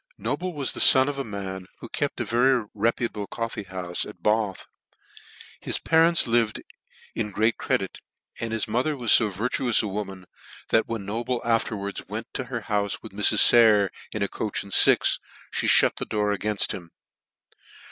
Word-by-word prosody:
Noble 185 0 -3
was 145 -3 -2
the - - -6
fon 130 0 +7
of 145 -1 -3
a - - -1
man 95 -4 -7
who - - -9
kept 145 +4 -3
a 120 - -2
very 120 +1 +2
reputable 110 -1 -2
coffee 115 -3 -5
houfe 90 -1 -4
at 85 - -15
Bath. 105 -2 0 0.9
His - - -2
parents 165 +1 +3
lived 115 -2 +1 0.5
in 105 -2 -3
great 110 +3 0
credit, - - -2 0.4
and 115 -1 -4
his 115 -1 -2
mother 125 +7 -1
was 120 -4 +5
fo 110 - +3
vir 105 +6 -3
tuous 125 -4 +1
a - - -2
woman, 95 -2 -6 0.4
that 115 - +2
when 115 -4 -5
Noble 120 +4 -3
afterwards 105 -3 -2
went 110 +4 -7
to 130 - -3
her 120 -1 -5
houfe 105 -2 -2
with - - -9
Mrs. 105 +1 +5
>ayer, 105 -5 +5 0.2
in 105 - -2
a - - 0
coach 105 +1 -4
and 100 - -8
fix, - - +5 0.4
me - - -2
fhut - - +5
tHe - - -5
door 105 -1 0
a^ 100 - -9
air, 105 0 0
ft - - 0
him. 85 -3 -7
110 Hz, 185 wpm, -24 LUFS, 100-120 Hz, 0.9 s, fon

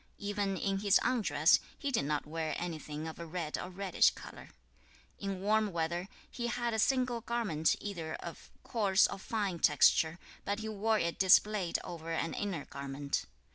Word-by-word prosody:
2. - - -8
Even 200 -2 -1
in 195 0 -1
his 200 -1 +4
undress, 170 - +4 0.2
he 280 - -2
did 225 - +1
not 150 0 -1
wear 160 0 -3
anything 155 -2 -5
of 160 - -8
a 170 - -5
red 160 -2 -3
or 180 - -5
reddish 190 0 +3
colour. - - -11 0.7
3. 200 - -3
In 190 -1 -5
warm 215 +1 +2
weather, 170 +2 -2 0.2
he 240 -1 -3
had 235 0 -1
a 220 - 0
single 250 0 +2
garment 210 -11 +1
either 170 -6 -5
of - - -9
coarse 200 -5 +3
or - - -3
fine 200 -4 -2
texture, 160 +1 +4 0.3
but 200 +1 -1
he 220 0 -5
wore 220 +1 +1
it 170 -4 -1
displayed 190 -1 +4
over 165 -1 -6
an 165 0 -1
inner 185 -8 -3
garment. 140 0 -3
190 Hz, 175 wpm, -32 LUFS, 160-215 Hz, 0.7 s, his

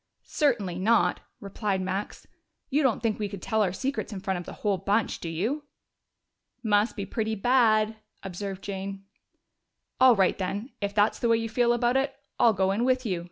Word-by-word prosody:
"Certainly 215 - 0
not!" 225 +5 +3 0.2
replied 200 0 -2
Max. 190 +2 -4 0.5
"You 290 +3 +3
don't 255 -5 +1
think 220 -2 0
we 205 -1 -2
could 200 -1 -7
tell 220 +4 0
our 190 -4 +2
secrets 225 +1 -3
in 200 - -5
front 190 -1 -2
of 175 - -9
the - - -7
whole 200 -3 +2
bunch, 200 +4 0
do 165 - -5
you?" 225 - -2 1.0
"Must 210 0 +2
be 200 -3 -4
pretty 220 +2 -2
bad," 220 -1 +3 0.3
observed 195 +1 -6
Jane. 195 0 -5 1.0
"All 255 -2 +7
right, 190 -2 +2
then, 200 +7 -3
if 200 0 -2
that's 210 +1 +3
the 235 - +1
way 230 - +5
you 225 0 -3
feel 240 +1 +2
about 240 +2 +2
it, 270 +1 -1 0.2
I'll 230 - +6
go 190 -1 +1
in 210 +4 0
with 255 0 +1
you!" 185 -6 -1
210 Hz, 190 wpm, -27 LUFS, 195-235 Hz, 1.0 s, All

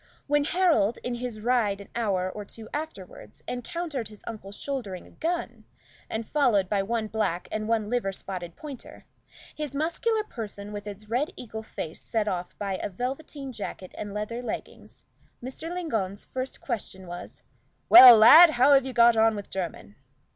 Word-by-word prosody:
When 290 0 +2
Harold, 320 - +2
in 245 - -3
his 240 -3 -5
ride 225 -4 +1
an 200 - -11
hour 195 -6 0
or 210 +3 -6
two 220 +2 -11
afterward, 295 - -7
encountered 265 0 -4
his 210 -1 -16
uncle 215 -4 -7
shouldering 205 -5 -5
a - - -17
gun, 340 +2 -3 0.5
and 220 0 -4
followed 240 -10 +2
by 200 0 +1
one 225 +2 -1
black 215 -5 -2
and 215 0 -3
one 225 -2 +1
liver 235 -4 -1
spotted 180 -3 -7
pointer, 285 -4 -10 0.5
his 300 -3 -5
muscular 425 +9 0
person 210 - -7
with 205 0 -6
its 205 +1 -9
red 250 +7 0
eagle 220 -2 -7
face 165 -7 -7
set 220 -2 -1
off 180 -3 -3
by 195 -2 -2
a - - -4
velveteen 270 +6 -5
jacket 200 -5 -7
and 205 - -6
leather 210 +4 -4
leggings, 245 - -8 0.3
Mr. 265 +7 -6
Lingon's 225 - -3
first 260 0 -5
question 200 -6 -5
was 175 0 -9 0.4
"Well, 255 -8 +11
lad, 320 +11 +10
how 275 -1 +4
have 270 -2 +5
you 260 - -5
got 235 -1 +6
on 225 0 +4
with 205 -1 -8
Jermyn?" 165 - -5
225 Hz, 170 wpm, -27 LUFS, 200-270 Hz, 0.5 s, Well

